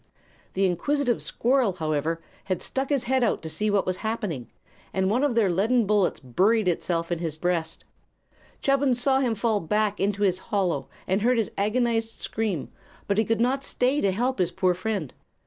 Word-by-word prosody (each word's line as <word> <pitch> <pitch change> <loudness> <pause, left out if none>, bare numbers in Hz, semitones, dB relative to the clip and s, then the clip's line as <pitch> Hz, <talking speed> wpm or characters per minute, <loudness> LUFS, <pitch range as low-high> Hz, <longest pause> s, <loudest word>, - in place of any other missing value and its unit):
The 195 +1 +2
inquisitive 245 - 0
squirrel, 245 -4 +1
however, 160 0 -2 0.2
had 185 -2 -2
stuck 270 0 -1
his 280 -4 +1
head 260 +1 +1
out 235 - 0
to 160 - -5
see 210 +7 -1
what 205 -1 +2
was 185 0 -1
happening, 210 - -3 0.5
and 190 0 +1
one 250 +5 +2
of 285 -5 +1
the 225 -4 +4
leaden 215 +7 +2
bullets 205 -2 +2
buried 190 - +2
itself 170 -1 -1
in 170 - 0
his 160 -3 -3
breast. 170 -1 -1 0.8
Chubbins 275 -2 +2
saw 265 +1 +3
him 245 -4 +1
fall 215 0 +1
back 210 +4 0
into 205 +1 0
his 185 -2 +2
hollow 195 -4 0 0.2
and 190 +2 0
heard 245 +3 +3
his 225 - 0
agonized 225 +2 0
scream; 210 -9 -2 0.4
but 200 +1 +1
he - - +4
could 225 0 0
not 260 +3 +1
stay 265 +2 +1
to 195 - +2
help 245 +5 -1
his 180 -2 +2
poor 180 +1 +1
friend. 185 - -3
210 Hz, 185 wpm, -25 LUFS, 180-240 Hz, 0.8 s, the